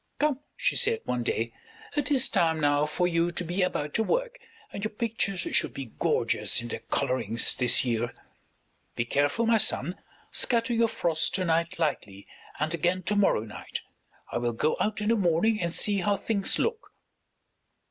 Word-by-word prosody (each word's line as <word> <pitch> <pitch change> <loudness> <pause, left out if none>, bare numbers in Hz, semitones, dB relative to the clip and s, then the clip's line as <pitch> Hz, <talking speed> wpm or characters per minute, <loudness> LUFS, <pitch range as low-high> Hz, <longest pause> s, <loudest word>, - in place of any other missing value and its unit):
"Come," 290 -3 +1 0.2
she - - +1
said 455 0 +1
one 125 -1 -1
day, 115 -1 -2 0.4
"it 295 - 0
is 270 -3 +5
time 165 -5 +1
now 145 0 +2
for 175 +4 0
you 170 0 +1
to 175 - -3
be 175 +3 -2
about 150 -5 -1
your 220 - +1
work, - - -1 0.3
and 200 - -5
your 215 - 0
pictures 210 -4 -1
should - - 0
be 130 -5 -7
gorgeous - - +1
in 120 0 -6
their - - -4
colorings 130 -4 +1
this 125 +1 +3
year. 120 0 -1 0.8
Be 115 - -1
careful, 145 - +1
my 225 -1 +4
son; 180 -4 0 0.3
scatter 235 0 +1
your 230 0 +3
frost 165 -6 +1
to 185 -1 0
night 165 0 0
lightly, 105 -11 -3 0.3
and 155 +2 0
again 175 +3 0
to 205 +5 0
morrow 200 - +3
night. 110 -1 -7 0.5
I - - -1
will 120 0 -1
go 150 +7 0
out 210 0 -1
in 210 - 0
the 230 - +4
morning 200 +3 +2
and 170 -1 -1
see 205 +3 +3
how 200 +2 +1
things 200 0 +1
look." 460 0 -3
175 Hz, 180 wpm, -27 LUFS, 145-215 Hz, 0.8 s, is